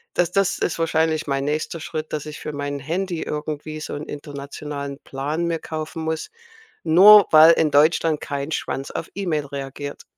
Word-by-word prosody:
Das 175 0 +1
das 195 -2 +1
ist 170 - -1
wahrscheinlich 160 -1 +1
mein 135 -1 -1
nächster 155 +3 -2
Schritt, 155 -1 -5
dass 150 -1 -3
ich 150 - -8
für 150 - -6
mein 145 0 -4
Handy 170 +4 -3
irgendwie 150 0 -5
so - - -5
'n 145 - -5
internationalen 140 -1 -7
Plan 145 +5 -3
mir 165 -1 -1
kaufen 160 +1 -6
muss, 160 0 -3 0.5
nur 195 +5 +8
weil 160 +1 +9
in 155 -2 +1
Deutschland 155 +1 +3
kein 140 +1 -4
Schwanz 135 -3 -3
auf - - -5
E-Mail 170 -7 -1
reagiert. 140 +1 -7
155 Hz, 170 wpm, -22 LUFS, 145-165 Hz, 0.5 s, weil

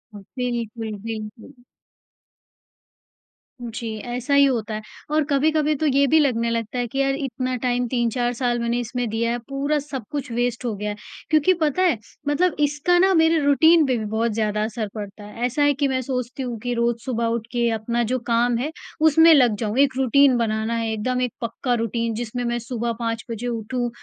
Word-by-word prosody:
ह - - -8 0.2
बिल्कुल, 235 -3 -3 0.2
बिल्कुल। 215 -1 -7 2.1
जी, 230 -1 -5
ऐसा 245 +3 -2
ही 280 0 +6
होता 230 -5 -1
है 215 - -3 0.3
और 305 0 +3
कभी-कभी 305 +2 +2
तो 310 +2 -2
ये 280 0 +4
भी 315 +2 +5
लगने 235 -5 +1
लगता 230 +1 -3
है 240 - -1
कि 270 +4 -4
यार 275 0 +2
इतना 255 -2 -3
टाइम 245 -1 0
3-4 240 0 0
साल 240 -1 0
मैंने 235 +1 0
इसमें 245 0 -3
दिया 230 +1 0
है, 240 - -1
पूरा 285 +2 0
सब 270 -4 -6
कुछ 280 -5 -4
वेस्ट 245 +1 -1
हो 230 - -1
गया। 210 +1 -3 0.4
क्योंकि 315 +4 +4
पता 310 +4 +1
है? 345 -10 +3 0.3
मतलब 335 +4 +2
इसका 295 +5 +2
ना 380 +1 +4
मेरे 320 0 +4
रूटीन 315 +3 +5
पे 255 - +1
भी 220 - -3
बहुत 220 +2 0
ज़्यादा 210 -1 0
असर 215 -1 -3
पड़ता 205 0 -7
है। 220 +4 -4
ऐसा 255 +4 0
है 290 0 +4
कि 280 +1 0
मैं 260 -1 0
सोचती 255 +1 -4
हूँ 240 -2 -4
कि 245 0 -1
रोज 235 0 0
सुबह 235 -3 -1
उठ 230 -1 -2
के 240 -1 +1
अपना 235 +2 -1
जो 255 - +1
काम 235 0 +2
है, 290 +6 -2 0.3
उसमें 320 +1 +7
लग 245 -7 +5
जाऊँ, 220 +1 -2
एक 275 -2 +4
रूटीन 265 0 +4
बनाना 220 0 -1
है, 230 -1 -1
एकदम 250 +4 -1
एक 250 -3 -1
पक्का 240 +2 -2
रूटीन 230 0 -1
जिसमें 240 +1 -4
मैं 240 0 -1
सुबह 235 0 -3
5 230 -1 -2
बजे 230 +2 -4
उठूँ 240 +1 -2
245 Hz, 195 wpm, -23 LUFS, 230-275 Hz, 2.1 s, उसमें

